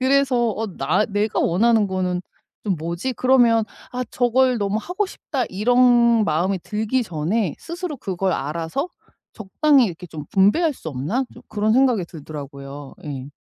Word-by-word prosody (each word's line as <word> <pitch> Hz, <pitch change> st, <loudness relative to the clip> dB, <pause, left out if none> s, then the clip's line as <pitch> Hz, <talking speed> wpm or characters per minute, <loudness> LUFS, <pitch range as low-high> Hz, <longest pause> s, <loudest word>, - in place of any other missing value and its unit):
그래서 270 Hz, 0 st, +3 dB, 0.2 s
"어 225 Hz, -, -3 dB
'나 150 Hz, +10 st, +1 dB
내가 205 Hz, 0 st, -1 dB
원하는 220 Hz, +4 st, +3 dB
거는 180 Hz, -1 st, -1 dB, 0.4 s
좀 195 Hz, -3 st, +1 dB
뭐지?' 170 Hz, +10 st, -3 dB
그러면 240 Hz, -4 st, +4 dB, 0.3 s
'아, 250 Hz, 0 st, -2 dB
저걸 250 Hz, 0 st, +2 dB
너무 205 Hz, +1 st, 0 dB
하고 380 Hz, +3 st, -2 dB
싶다.' 275 Hz, -8 st, -3 dB
이런 235 Hz, +1 st, +4 dB
마음이 185 Hz, +3 st, 0 dB
들기 220 Hz, +4 st, 0 dB
전에 175 Hz, +2 st, -1 dB
스스로 340 Hz, -3 st, -5 dB
그걸 190 Hz, 0 st, -1 dB
알아서 165 Hz, -, -2 dB, 0.5 s
적당히 260 Hz, +6 st, +3 dB
이렇게 180 Hz, -1 st, -7 dB
좀 155 Hz, -2 st, -8 dB
분배할 235 Hz, -, +3 dB
수 160 Hz, -, -8 dB
없나?" 155 Hz, -, -1 dB
좀 -, -, -13 dB
그런 215 Hz, +1 st, +1 dB
생각이 250 Hz, -7 st, +3 dB
들더라고요. 140 Hz, -3 st, -9 dB
예. 135 Hz, -1 st, -6 dB
210 Hz, 310 characters per minute, -22 LUFS, 170-250 Hz, 0.5 s, 그러면